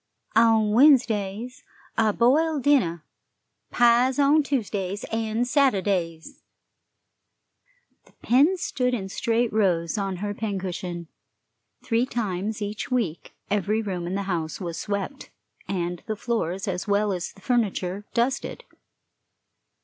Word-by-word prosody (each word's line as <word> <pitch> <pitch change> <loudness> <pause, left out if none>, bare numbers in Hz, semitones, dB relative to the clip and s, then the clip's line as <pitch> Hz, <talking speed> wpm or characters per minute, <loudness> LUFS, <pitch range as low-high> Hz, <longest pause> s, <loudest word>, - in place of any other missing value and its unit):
On 225 -2 +4
Wednesdays, 235 -3 +3 0.3
a 220 -1 +3
boiled 285 +6 +2
dinner. 175 - +2 0.6
Pies 245 +2 +4
on 290 +2 +5
Tuesdays 205 -8 -2
and 225 +1 -1
Saturdays." 195 - 0 1.6
The - - -24
pins 300 +9 +3
stood 250 -1 0
in 190 -4 -5
straight 230 +3 0
rows 185 -3 +1
on 195 -1 -2
her 205 +3 -3
pincushion; 185 -4 -4 0.8
three 235 +2 +1
times 210 -2 -3
each 205 +5 -4
week 225 - -2 0.2
every 210 +2 +1
room 180 -4 -3
in 180 - -3
the 200 - -1
house 165 -5 -3
was 170 -3 -5
swept, 205 +7 -4 0.4
and 175 -2 -3
the 215 - -2
floors, 205 -5 -2
as 185 +1 -3
well 205 0 +2
as 180 -2 -4
the 195 - -19
furniture, 200 -5 -1
dusted. 250 +3 -1
210 Hz, 120 wpm, -25 LUFS, 190-240 Hz, 1.6 s, on